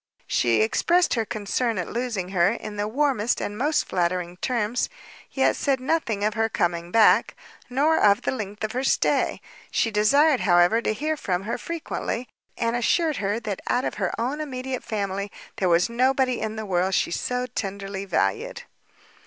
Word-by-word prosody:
She 115 -3 +2
expressed 345 - +2
her 225 -2 0
concern 215 +2 -1
at 180 - -2
losing 230 -6 -3
her 185 -1 +3
in 215 -2 -7
the 205 0 -1
warmest 245 -2 +1
and 205 - -4
most 290 +7 +1
flattering 180 0 -1
terms, 235 +2 -1 0.4
yet 270 - +2
said 275 -2 0
nothing 255 -7 -1
of 215 +1 +1
her 225 0 0
coming 170 -3 -1
back, 215 +1 +4 0.3
nor 290 +6 +2
of 200 0 +4
the - - 0
length 210 -4 -5
of 215 - -1
her 255 +2 -2
stay; - - +1 0.3
she 230 - +1
desired, 275 +7 +4
however, 175 +4 +4
to 215 - 0
hear 310 +6 -1
from 185 -10 -2
her 220 - -3
frequently, 310 -7 -4 0.3
and 230 0 0
assured 310 +5 +1
her 205 +2 -1
that 205 -4 -4
out 250 - +1
of - - -2
her 185 - +1
own 265 +6 -1
immediate 260 -3 -4
family, 200 -1 -3 0.3
there 185 - +1
was 170 0 +4
nobody 255 +1 +1
in 220 0 -3
the 220 0 -5
world 185 0 +1
she - - +1
so 250 +7 -1
tenderly 200 -4 -5
valued. 455 - -1
220 Hz, 175 wpm, -24 LUFS, 195-255 Hz, 0.4 s, back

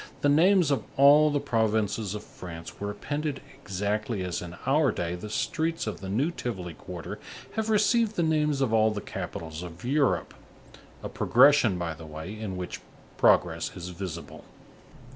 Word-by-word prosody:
the 145 - +3
names 175 +2 +5
of 140 - +1
all 145 +2 +7
the 145 -1 +1
provinces 110 -4 0
of 105 - -6
France 85 -2 -10
were 100 - -3
appended 145 +6 -3
exactly 105 +1 -2
as 90 -2 -3
in 90 0 -7
our 145 +1 +3
day, 85 0 -3
the 90 +4 -6
streets 160 +7 -1
of 110 - -5
the 95 - -6
new 130 - +1
Tivoli 95 - -5
quarter - - -8 0.3
have 220 0 -2
received 220 +1 +3
the 170 - +1
names 150 -3 +1
of 125 -4 +1
all 110 0 +5
the 105 -1 -3
capitals 80 -4 -6
of 90 +3 -9
Europe; 140 +1 +1 0.7
a - - -3
progression, 125 -6 +5
by 85 -2 -2
the 80 0 -11
way, 80 +6 -7
in 105 -4 -5
which 90 -1 -5 0.4
progress - - +3
is 90 0 -6
visible. 85 -4 -7
110 Hz, 165 wpm, -27 LUFS, 90-145 Hz, 0.7 s, all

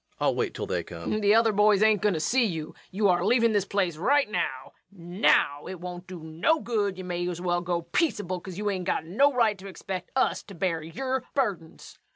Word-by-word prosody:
I'll - - +2
wait - - -2
till - - -3
they - - -2
come. - - -6
LUKE. 215 - 0
The 205 +1 +4
other 225 0 +4
boys 210 0 +4
ain't 215 -3 +4
goin' 205 -4 +2
to - - -2
see 245 +11 +2
you. 165 -7 -3 0.2
You're 190 -2 +2
a - - -2
leavin' 230 -2 +4
this 205 -3 +1
yer - - -28
place 185 -5 0
right 280 - +2
now 130 -10 -3 0.2
now! 175 -5 +1
It 185 - -7
won't 180 0 -8
do 180 -3 -9
no 165 - +1
good. 205 -7 -1
You 185 - -6
may 175 0 -3
as 175 -1 -5
well 175 -1 0
go 175 -1 -2
peaceable; 185 - -1
ye 195 +3 -4
ain't 190 -3 -2
got - - -1
no 260 +12 +3
right 225 -6 +1
to 195 - -9
expect 190 -1 -6
us 265 - +1
to 200 - -11
bear 170 -2 -1
yer 260 +11 -3
burdens. 200 - -3
190 Hz, 225 wpm, -27 LUFS, 175-215 Hz, 0.2 s, The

